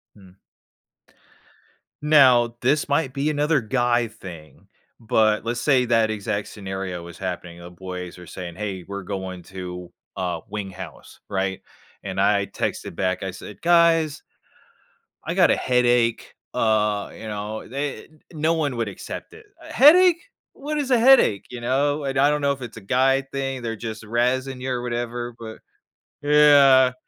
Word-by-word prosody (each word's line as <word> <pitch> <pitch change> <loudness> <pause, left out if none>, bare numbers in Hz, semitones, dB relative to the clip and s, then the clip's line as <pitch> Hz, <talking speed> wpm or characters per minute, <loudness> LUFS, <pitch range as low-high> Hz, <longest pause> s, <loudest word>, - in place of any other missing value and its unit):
Hmm. 95 -2 -18 1.6
Now, 130 -6 +5
this 140 +4 +1
might 140 -2 0
be 140 +2 -1
another 150 0 +1
guy 120 0 +1
thing, 85 -8 -12 0.3
but 110 -2 +2
let's 120 +1 -2
say 130 -4 +3
that 115 -2 +2
exact 100 -1 -3
scenario 95 -3 -6
was 85 -1 -11
happening, 90 -2 -6
the 85 0 -11
boys 90 0 -7
were 90 -1 -12
saying, 90 -2 -8
“Hey, 95 -2 -5
we're 100 +1 -7
going 95 -1 -5
to, 90 -1 -8 0.2
uh, 90 -3 -3
Wing 100 -1 -5
House," 95 -2 -11
right? 95 -1 -2 0.4
And 95 -1 -2
I 100 0 +3
texted 85 - -4
back, 90 +1 -1
I 95 - -3
said, 100 +2 -11
“Guys" 165 -3 +3 1.0
"I - - -2
got - - +4
a - - +4
headache,” 120 -2 +1 0.2
uh, 105 -2 +1
you 110 - -9
know, 105 +1 -5
they, 140 +3 -4
uh - - -22 0.3
no 160 +1 +1
one 150 -5 -1
would 115 -2 -1
accept 100 - -8
it, 440 0 -14 0.2
“A - - -11
headache? 345 +4 +6 0.3
What 300 +2 -4
is 280 -3 -2
a 245 - +5
headache?” 240 - +5
You 125 -1 -8
know? 145 +4 0
And 135 -1 -2
I 140 +2 +5
don't 150 0 0
know 140 0 +2
if 140 -1 -5
it's 120 -2 -8
a - - -9
guy 130 +6 +2
thing. 135 -1 -4
They're 115 -1 -3
just 110 0 -7
razzing 125 +4 -1
you 130 +1 -3
or 125 -1 -2
whatever, 120 0 -4
but 110 -1 -9 0.6
Yeah, 145 -3 +6
120 Hz, 165 wpm, -23 LUFS, 95-140 Hz, 1.6 s, headache